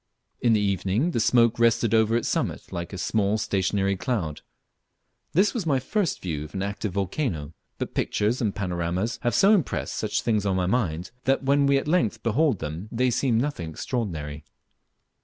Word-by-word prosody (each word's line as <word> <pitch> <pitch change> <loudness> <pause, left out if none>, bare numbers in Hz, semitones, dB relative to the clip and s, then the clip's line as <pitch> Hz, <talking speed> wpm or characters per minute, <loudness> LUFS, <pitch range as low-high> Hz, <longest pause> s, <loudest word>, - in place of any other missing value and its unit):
In 120 -2 +4
the 110 - +3
evening 100 - 0
the 115 - 0
smoke 115 0 +3
rested 115 -1 +3
over 110 +1 +4
its 120 - -2
summit - - -2
like 85 0 -5
a 95 - -6
small 100 +3 +1
stationary 100 -1 0
cloud. 90 - -2 0.9
This 195 +5 +3
was 210 -9 -3
my 140 -3 +3
first 175 - -1
view 80 -5 -3
of 75 - -11
an 95 - -1
active 100 -1 -3
volcano, 90 - -2 0.2
but - - -4
pictures 110 +5 0
and 105 -4 0
panoramas 90 +3 -2
have 120 - 0
so 200 +2 +6
impressed 185 - 0
such - - -1
things 110 -3 +1
on 95 -2 0
one's 90 0 0
mind, 90 -8 -1
that 135 +1 +2
when 140 +1 +3
we 140 0 +4
at 135 - -2
length 165 -9 +1
behold 130 +2 +2
them 80 +6 -6
they 125 +2 +1
seem 120 -1 +1
nothing 120 - -2
extraordinary. 80 - -4
110 Hz, 180 wpm, -25 LUFS, 95-125 Hz, 0.9 s, so